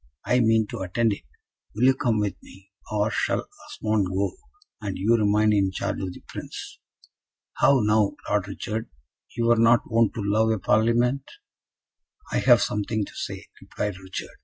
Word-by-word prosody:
I 125 - +3
mean 115 -2 +3
to - - -5
attend 105 +4 +1
it. 100 - -9 0.5
Will 110 - -1
you 130 +1 +6
come 120 -5 0
with 105 -2 0
me, 95 +1 -17 0.2
or 105 0 +1
shall - - 0 0.2
Osmond 105 -3 -1
go, 95 +2 -1 0.5
and 100 -3 -4
you 110 +5 +3
remain 105 0 +3
in 100 -2 +2
charge 95 - -3
of 95 -1 -3
the - - -13
Prince?" - - -8 0.8
"How 135 -2 +4
now, 105 -1 +2
Lord 100 -2 0
Richard, 110 +3 -5 0.5
you 115 - +1
were 120 0 +4
not 115 +1 +5
wont 115 -1 +3
to 110 - -3
love 110 +2 +2
a 110 - +1
Parlement?" 120 +7 +1 1.0
"I - - +1
have - - +5
something 105 0 -1
to - - -13
say," - - -6 0.2
replied 105 -2 -4
Richard. 95 0 -8
110 Hz, 170 wpm, -25 LUFS, 100-115 Hz, 1.0 s, you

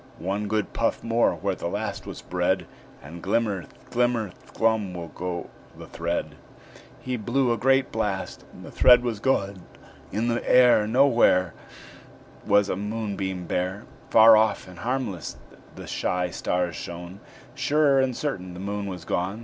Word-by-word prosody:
One 100 +3 -3
good 110 0 -1
puff 115 - -1
more 115 +1 +2
where 100 -1 -2
the 90 - -5
last 100 +2 -4
was - - -8
bred, - - 0 0.4
And 85 +4 -10
glimmer, 100 -2 0 0.3
glimmer, 120 -4 +1 0.2
glum 110 -5 0
will 85 -1 -6
go 90 +2 -5 0.3
the - - -9
thread." 85 +1 -3 0.6
He 130 -1 -3
blew 120 +3 +1
a - - -2
great 135 +1 +3
blast, 105 -4 -3
and - - -12
the - - -10
thread 125 -1 +6
was 115 -4 -2
gone. 100 -6 0 0.5
In 110 +3 -1
the 120 0 0
air 125 -4 +6
Nowhere 115 - +4 0.9
Was 100 0 +4
a - - -1
moonbeam 100 -3 -4
bare; 95 +4 -2 0.2
Far 110 0 +8
off 110 -2 +2
and 90 -2 -12
harmless 120 -5 -3 0.4
the - - -9
shy 90 -1 -1
stars 90 -1 -1
shone 85 +2 -8 0.3
Sure 145 -2 +3
and 130 -2 0
certain 95 -12 -4
the - - -8
Moon 100 +1 -4
was 90 -3 -7
gone! 95 +5 -2
105 Hz, 155 wpm, -25 LUFS, 90-120 Hz, 0.9 s, Far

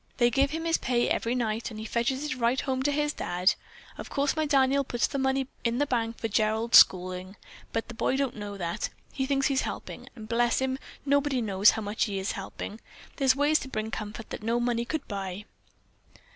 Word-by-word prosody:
They 240 0 +4
give 275 +3 +3
him 325 +3 -4
his 330 0 +2
pay 240 -1 +1
every 235 +2 0
night, 230 -1 -1
and 215 -2 -8
he 220 - -6
fetches 240 +5 0
it 300 - -2
right 245 +1 +1
home 260 -1 -1
to 290 +2 +1
his 295 0 0
Dad. 180 +2 +1 0.5
Of - - -7
course 280 0 0
my 310 -1 0
Daniel 275 -1 +3
puts 240 -3 0
the 275 - -3
money 265 0 +1 0.2
in 235 0 +1
bank 235 -5 0
for 225 - -2
Gerald's 220 +2 +5
schooling, 185 +1 +2 0.4
but 225 - -2
the 240 - -8
boy 235 - 0
don't 275 -2 -1
know 205 -2 -6
that. 170 -2 -2 0.2
He 265 -1 -1
thinks 275 -1 +1
he's 275 -2 +2
helping, - - -6
and 220 -3 -9
bless 235 +1 +2
him, 265 0 -1 0.3
nobody 285 -1 +2
knows 205 -3 +4
how 220 - -3
much 205 +2 0
he 200 -2 -3
is 190 +1 -1
helping. 200 +2 -7 0.4
There's 265 -2 +4
ways 290 +2 +3
to - - -7
bring 220 -3 -3
comfort 220 +1 -6
that - - -5
no 230 +2 0
money 240 -1 0
could 315 +5 -3
buy." 195 -1 -5
240 Hz, 215 wpm, -28 LUFS, 215-270 Hz, 0.5 s, Gerald's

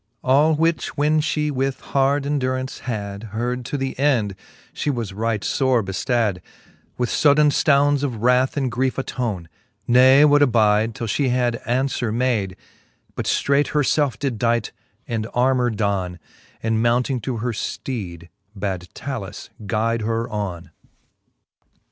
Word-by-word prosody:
All 145 +5 +4
which 165 +1 0
when 155 +2 +3
fhe 150 -1 -1
with 135 0 -1
hard 140 +1 +1
enduraunce 130 -2 -2
had 105 -3 -5
Heard 125 +2 -2
to 145 - -3
the 135 -1 -2
end, 120 -9 +1 0.4
fhe 145 - -1
was 115 -7 -4
right 110 0 -2
fore 130 -4 +2
beftad, 100 0 -1 0.6
With 125 -2 -1
fodaine 150 0 +4
ftounds 145 0 +3
of 120 -6 -3
wrath 125 +3 +3
and 135 -3 0
griefe 130 +3 0
attone: 115 -10 -3 0.4
l^e 130 +4 +7
would 145 0 +4
abide, 110 -4 +3
till 115 - -4
fhe 130 +5 0
had 120 -1 0
aunfwere 125 -1 0
made, 110 -6 0 0.6
But - - -4
ftreight 140 +1 +2
herfelf 145 -4 +2
did 130 -6 -3
dight, 115 -1 +1 0.4
and 110 -2 -2
armour 125 0 +2
don; 100 -5 -1 0.5
And 110 0 +1
mounting 120 +2 +1
to 125 +1 -3
her 120 +3 -2
fteed, 95 -7 -5 0.3
bad 95 -3 -4
Talus 125 -8 -6 0.2
guide 115 +3 0
her 115 +1 -1
on. 100 -5 -4
125 Hz, 140 wpm, -22 LUFS, 110-135 Hz, 0.6 s, l^e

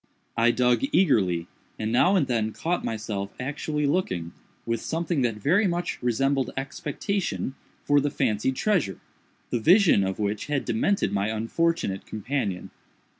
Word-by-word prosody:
I 115 +1 +4
dug 125 0 +3
eagerly, 95 - +3 0.3
and 110 0 -2
now 180 +11 +4
and 175 -7 +3
then 110 -4 -1
caught 175 +2 -2
myself 105 -3 -3
actually 150 +3 -2
looking, 95 - -1 0.3
with 115 -1 -1
something 165 -2 -1
that 120 -3 +1
very 180 - +2
much 175 0 -2
resembled 135 +2 +1
expectation, 170 +4 -3 0.3
for 145 0 +3
the 145 - 0
fancied 130 -1 0
treasure, 160 - 0 0.5
the 120 - +1
vision 175 - +5
of 95 0 -2
which 105 0 -2
had 145 -2 -1
demented 120 - +1
my 100 0 +1
unfortunate 115 - -1
companion. 110 -4 -3
125 Hz, 140 wpm, -26 LUFS, 110-160 Hz, 0.5 s, vision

